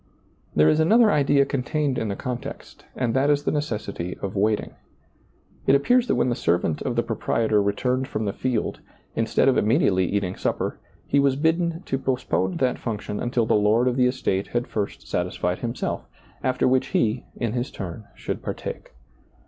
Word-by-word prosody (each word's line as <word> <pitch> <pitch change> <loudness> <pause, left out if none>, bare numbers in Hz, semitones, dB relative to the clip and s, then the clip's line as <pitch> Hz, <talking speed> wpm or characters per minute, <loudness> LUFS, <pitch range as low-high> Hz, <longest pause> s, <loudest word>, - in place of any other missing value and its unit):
There 75 0 +5
is 155 - +4
another 215 +7 +5
idea 140 -2 +4
contained 140 +1 -1
in 110 - -2
the 100 - -2
context, 125 0 -6
and 120 -3 0
that 135 +2 +2
is 145 0 +2
the - - +1
necessity 105 - -3
of 100 0 -4
waiting. 105 +2 +1 0.9
It 135 - +6
appears 245 - +3
that - - +2
when - - +2
the - - +1
servant 85 -4 0
of 125 - -2
the 120 - +2
proprietor 110 -1 +1
returned 125 +6 0
from 110 -5 -3
the 100 - -1
field, 125 -4 -2 0.4
instead 115 +3 +2
of 135 - +4
immediately 95 -3 +3
eating 95 -1 -1
sup - - -1
per, - - -3 0.3
he 140 - +2
was 140 -1 +3
bidden 165 +3 0
to 135 - -1
postpone 125 -8 -1
that 130 -1 0
function 105 -3 -4
until 120 -1 0
the - - +2
lord 105 +4 +3
of 125 - +1
the 125 -1 +4
estate 100 -6 -1
had 120 0 -1
first 105 -2 -4
satisfied 90 0 -1
himself, 120 +1 -3 0.4
after 130 0 +2
which 130 0 +2
he, 115 +2 0
in 115 -3 -2
his 125 +1 -2
turn, 95 +2 -7
should - - -4
partake. - - -6
120 Hz, 180 wpm, -24 LUFS, 105-135 Hz, 0.9 s, It